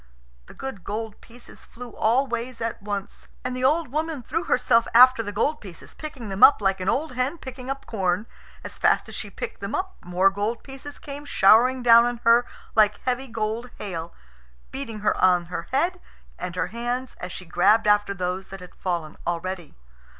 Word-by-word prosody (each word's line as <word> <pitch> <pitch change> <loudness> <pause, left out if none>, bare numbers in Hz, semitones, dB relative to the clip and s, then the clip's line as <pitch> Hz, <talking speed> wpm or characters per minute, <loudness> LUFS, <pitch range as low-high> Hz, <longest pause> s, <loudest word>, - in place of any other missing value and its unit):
The - - -14
good 265 -9 -7
gold 215 +1 -5
pieces 240 +1 -15
flew 245 +1 -11
all 245 +5 +2
ways 240 -1 -4
at 230 -2 -3
once. 200 -1 -5 0.2
And 255 0 -3
the 255 - -4
old 300 +2 +2
woman 310 -1 -3
threw 330 +8 -2
herself 230 -2 +3
after 255 0 +8
the 205 -2 -5
gold 285 +9 0
pieces, 185 -6 -11
picking 275 -8 -8
them 195 0 -5
up 285 - +9
like 195 -2 +1
an 185 - 0
old 310 +3 0
hen 255 +6 -1
picking 260 -3 -9
up 275 0 -4
corn. 190 -1 -1 0.4
As - - -9
fast - - +3
as - - -10
she - - -6
picked - - -7
them - - -3
up 380 0 -4
more 180 +2 +3
gold 210 +4 -3
pieces 270 +1 -10
came 285 0 -8
showering 250 +1 +4
down 235 0 +7
on 240 0 -1
her 235 +1 +5 0.3
like 210 -1 +4
heavy 255 +1 -1
gold 225 +1 -3
hail, 170 -4 -5 0.6
beating 230 -6 -6
her 210 - +2
on 180 -2 +4
her 170 - -4
head 345 +7 +1 0.4
and 180 -1 -5
her - - -1
hands 245 +2 -3
as 180 - -5
she 185 - -8
grubbed 195 +6 +3
after 205 -1 +3
those 185 +1 -3
that 195 - -9
had 180 -1 -12
fallen 170 -4 -4
already. 175 -1 -4
230 Hz, 195 wpm, -24 LUFS, 195-260 Hz, 0.6 s, up